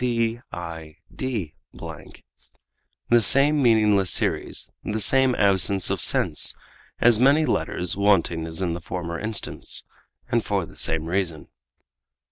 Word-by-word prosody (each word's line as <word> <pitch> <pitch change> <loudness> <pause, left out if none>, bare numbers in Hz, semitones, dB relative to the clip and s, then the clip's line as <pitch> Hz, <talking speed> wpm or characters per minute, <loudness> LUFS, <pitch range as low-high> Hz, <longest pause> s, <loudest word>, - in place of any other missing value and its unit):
cid._ 115 - -5 1.6
the 120 0 +5
same 140 +6 +5
meaningless 105 -5 +3
series, - - -2
the 110 +1 -3
same 130 +4 +3
absence 100 -1 +2
of - - -2
sense, - - +3 0.4
as 120 -2 +4
many 140 +5 +3
letters 90 - -2
wanting 90 -5 +1
as 80 +3 -6
in 85 -2 -2
the 85 - -6
former 85 0 -6
instance, 110 -1 -3 0.4
and - - 0
for - - -2
the - - -17
same 80 -1 -1
reason. 85 -2 -3
100 Hz, 115 wpm, -23 LUFS, 85-120 Hz, 1.6 s, the